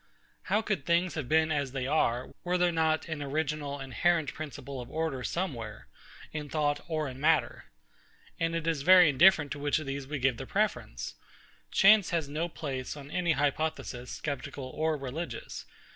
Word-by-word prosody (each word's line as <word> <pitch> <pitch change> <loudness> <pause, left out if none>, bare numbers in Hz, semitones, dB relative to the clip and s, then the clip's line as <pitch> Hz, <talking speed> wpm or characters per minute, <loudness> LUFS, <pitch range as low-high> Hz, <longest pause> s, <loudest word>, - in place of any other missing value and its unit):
How 210 +3 +2
could 210 -10 -1
things 170 +3 +2
have 145 -6 -4
been 160 0 +3
as 140 -4 -1
they 130 -2 -2
are, 130 -4 +1
were 180 +1 +1
there 180 -1 +3
not 160 -1 +1
an 160 -3 -4
original 145 0 -2
inherent 155 +4 +1
principle 140 -3 -6
of 120 - -10
order 155 -5 -2
somewhere, 120 - -4 0.5
in 150 -2 -5
thought 145 -1 0
or 155 -3 -1
in 130 0 -8
matter? 160 +1 +2 0.7
And 165 0 0
it 165 -1 -2
is 165 -4 0
very 180 +1 +8
indifferent 150 0 +5
to 145 - -4
which 145 0 +1
of 155 - -4
these 135 0 -4
we 150 +1 -3
give 130 -2 +1
the - - -7
preference. - - -1 0.6
Chance 200 -1 +6
has 165 -4 0
no 155 +4 -2
place, 140 -4 -5
on 145 0 -10
any 175 -1 +1
hypothesis, 145 -3 -2
sceptical 140 -2 -4
or 155 0 +1
religious. 135 - -6
150 Hz, 175 wpm, -30 LUFS, 135-165 Hz, 0.7 s, very